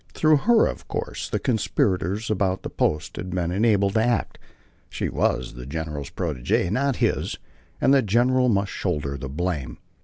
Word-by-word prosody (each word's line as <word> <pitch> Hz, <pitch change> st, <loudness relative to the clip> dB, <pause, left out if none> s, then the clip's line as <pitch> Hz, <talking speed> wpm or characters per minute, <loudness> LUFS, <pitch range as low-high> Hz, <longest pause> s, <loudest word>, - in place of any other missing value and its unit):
Through 155 Hz, -1 st, +4 dB
her, 235 Hz, -2 st, +6 dB
of -, -, -4 dB
course, -, -, -4 dB
the -, -, 0 dB
conspirators 105 Hz, -3 st, 0 dB
about 95 Hz, -2 st, 0 dB
the -, -, -5 dB
post 75 Hz, +2 st, -1 dB
had 90 Hz, -, -5 dB
been 90 Hz, -1 st, -1 dB
enabled 100 Hz, -1 st, +2 dB
to 110 Hz, 0 st, +3 dB
act. 120 Hz, -1 st, 0 dB, 0.5 s
She -, -, -3 dB
was 65 Hz, -1 st, 0 dB
the -, -, -9 dB
general's 75 Hz, -1 st, -4 dB
protegée, 65 Hz, +7 st, -1 dB
not 135 Hz, +4 st, +1 dB
his, -, -, 0 dB, 0.4 s
and 135 Hz, -, +4 dB
the 135 Hz, -, +5 dB
general 125 Hz, +4 st, +3 dB
must 100 Hz, -2 st, +1 dB
shoulder 75 Hz, -6 st, -2 dB
the 70 Hz, 0 st, -6 dB
blame. 75 Hz, -4 st, -3 dB
95 Hz, 165 wpm, -24 LUFS, 75-115 Hz, 0.5 s, her